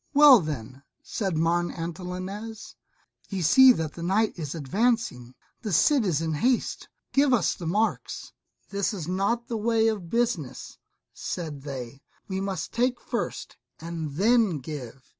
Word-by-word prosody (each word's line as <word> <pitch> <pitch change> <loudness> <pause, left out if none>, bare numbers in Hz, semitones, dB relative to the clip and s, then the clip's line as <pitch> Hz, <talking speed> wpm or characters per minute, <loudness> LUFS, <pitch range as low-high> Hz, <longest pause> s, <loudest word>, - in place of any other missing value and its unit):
"Well 290 -4 +9
then," 135 - -5 0.2
said 190 -7 -2
Martin 170 +2 +1
Antolinez, 185 +6 -6 0.5
"ye 190 -3 -2
see 260 - +8
that 160 -7 -3
the 170 - -9
night 200 +5 +1
is 155 -3 -5
advancing; 160 - -1 0.3
the 215 -4 -4
Cid 260 - +4
is 165 -5 +1
in 160 -1 -1
haste, 240 - 0 0.2
give 280 0 +4
us 210 - +1
the 170 - -7
marks." 210 +6 -1 0.4
"This 200 +2 -1
is 170 -5 -5
not 200 +6 0
the 230 - -2
way 225 +1 +2
of 200 -6 -4
business," 225 - -2 0.3
said 155 -5 -5
they; 135 -2 -7 0.3
"we 190 -1 -3
must 195 -1 -3
take 245 +1 +1
first, - - -4 0.2
and 165 -3 -5
then 215 -1 +3
give." 135 -2 -8
185 Hz, 145 wpm, -26 LUFS, 155-225 Hz, 0.5 s, Well